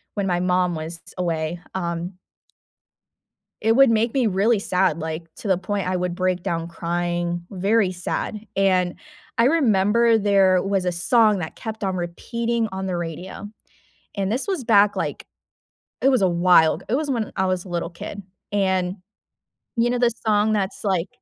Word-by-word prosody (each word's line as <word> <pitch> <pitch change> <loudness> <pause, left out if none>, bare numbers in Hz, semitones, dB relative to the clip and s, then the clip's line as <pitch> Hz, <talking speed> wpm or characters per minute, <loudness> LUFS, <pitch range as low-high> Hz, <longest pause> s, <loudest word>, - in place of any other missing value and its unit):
when 200 -2 -1
my 175 -1 +1
mom 180 -1 +1
was 160 +2 -5
s - - -10
away, 170 -1 -2 0.2
um 175 0 -3 1.4
It 225 +1 +3
would 270 0 +7
make 225 +1 +2
me 260 -4 +2
really 205 +3 +2
sad, 185 -4 +1
like, 160 +1 -5
to - - -7
the 190 -2 +3
point 195 0 -3
I 185 - 0
would 180 -1 -2
break 185 -1 0
down 170 -3 -2
crying. 175 0 -2
Very 200 +1 +1
sad, 205 +4 -4
and 185 -2 +2 0.4
I 230 - +4
remember 230 -5 +3
there 195 -3 +4
was 195 -2 -1
a 180 - +1
song 210 +4 +3
that 160 -2 -5
kept 220 -1 -6
on 190 -1 -1
repeating 230 +7 -2
on 190 0 -4
the 180 - -2
radio, 175 +4 -6 0.7
and 195 -1 -1
this 250 - -1
was 375 -9 -2
back, 210 -3 +4
like, - - -3 0.8
it 270 - +3
was 255 -6 +2
awhile. 175 -3 +4
It 225 - 0
was 295 +1 0
when 230 -5 -2
I 190 - +1
was 185 -1 -1
a - - -11
little 170 -1 -3
kid, 195 +3 -8 0.3
and, 190 -2 +1 0.8
you 235 +1 +3
know 245 0 0
the 240 -1 +3
song 215 0 +3
that's, 200 -2 -2
like 190 -3 0
190 Hz, 175 wpm, -23 LUFS, 175-220 Hz, 1.4 s, would